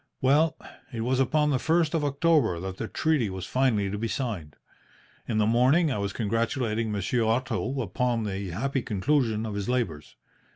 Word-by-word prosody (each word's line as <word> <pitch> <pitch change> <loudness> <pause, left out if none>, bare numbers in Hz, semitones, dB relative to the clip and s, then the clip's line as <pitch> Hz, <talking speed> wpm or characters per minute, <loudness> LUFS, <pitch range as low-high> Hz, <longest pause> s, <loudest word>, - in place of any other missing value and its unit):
"Well, 150 +4 +3 0.3
it 115 -3 -4
was 130 +3 0
upon 150 +3 +2
the 130 - +1
first 160 +1 +2
of 160 -3 +1
October 145 - +2
that 95 +1 -5
the 110 - -4
treaty 150 -8 +1
was 95 -1 -5
finally 125 -6 +1
to 105 - -3
be 115 - -1
signed. 110 - -4 0.7
In 110 - -1
the 105 - +3
morning 130 +8 +3
I 105 - -1
was 100 0 -2
congratulating 115 0 -1
Monsieur 105 +4 0
Otto 125 +3 -1
upon 120 +1 -1
the 100 -2 -3
happy 135 +10 -1
conclusion 115 +1 0
of 110 - -4
his 100 +2 -3
labours. 95 -13 -2
115 Hz, 175 wpm, -27 LUFS, 105-135 Hz, 0.7 s, Well